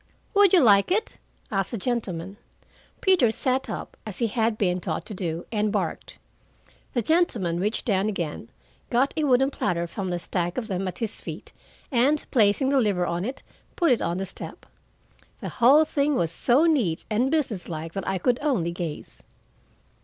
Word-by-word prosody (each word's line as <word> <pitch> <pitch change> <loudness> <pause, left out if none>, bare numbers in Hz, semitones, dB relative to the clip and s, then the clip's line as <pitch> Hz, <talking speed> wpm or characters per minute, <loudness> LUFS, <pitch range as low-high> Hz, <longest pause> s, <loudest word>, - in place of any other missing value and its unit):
"Would 405 -3 +6
you 370 - +6
like 200 -5 +5
it?" 430 +5 -1 0.3
asked 195 -2 0
the 235 - -4
gentleman. 195 -5 -3 0.6
Peter 365 - +4
sat 255 +3 -1
up, - - -6
as 210 -4 -7
he 235 - +1
had 225 0 0
been 180 -3 0
taught - - -3
to 215 - -7
do, 175 -3 -4
and 210 -2 0
barked. - - -3 0.8
The 240 - +1
gentleman 220 - +1
reached 210 +4 -1
down 200 -2 +1
again, 165 - -4 0.4
got 255 +4 +2
a 310 -2 0
wooden 270 0 +3
platter 170 -9 -1
from 185 +2 -4
a 175 - -1
stack 175 0 -3
of 250 - -1
them 195 -2 -2
at 180 - -5
his 225 -2 -4
feet, - - -8 0.4
and 275 +4 +2
placing 230 +2 +3
the 275 -1 +3
liver 195 -5 +1
on 175 +1 -2
it, 255 +6 -5 0.3
put 340 -5 +3
it 245 - +2
on 170 +1 -1
the 195 - -2
step. - - -10 0.7
The - - -5
whole 275 +6 +5
thing 290 -1 +1
was 165 -8 0
so 250 - +3
neat 245 - +1
and 240 +5 +2
businesslike 180 - -2
that 195 - -4
I 190 - 0
could 245 +7 +1
only 235 - 0
gaze. 170 -3 -6
215 Hz, 180 wpm, -25 LUFS, 180-265 Hz, 0.8 s, Would